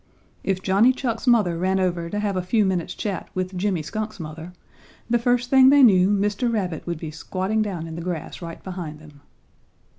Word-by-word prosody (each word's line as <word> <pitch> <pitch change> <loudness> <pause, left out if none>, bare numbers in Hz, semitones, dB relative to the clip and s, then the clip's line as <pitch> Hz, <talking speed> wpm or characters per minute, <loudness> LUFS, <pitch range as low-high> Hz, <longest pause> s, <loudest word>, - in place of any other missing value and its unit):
If 190 -1 -1
Johnny 205 +7 +4
Chuck's 245 -1 -3
mother 205 -9 +3
ran 190 +1 +1
over 175 -2 -1
to 205 - -3
have 205 -2 -1
a 185 - 0
few 205 +4 +1
minutes' 180 -3 -1
chat 200 -3 -4
with 185 0 -3
Jimmy 180 -3 -1
Skunk's 215 +5 -5
mother, 160 +2 -8 0.6
the 240 +1 +2
first 245 +1 +1
thing 265 -1 +7
they 285 0 +6
knew 190 -5 +6
Mr. 205 +4 +1
Rabbit 185 -8 -3
would 170 -1 -2
be 155 0 -6
squatting 190 +7 -2
down 190 -6 -3
in 165 - -7
the 170 - -6
grass 175 -1 -5
right 165 -1 -8
behind 175 -5 -6
them. 150 -2 -16
190 Hz, 200 wpm, -23 LUFS, 170-215 Hz, 0.6 s, thing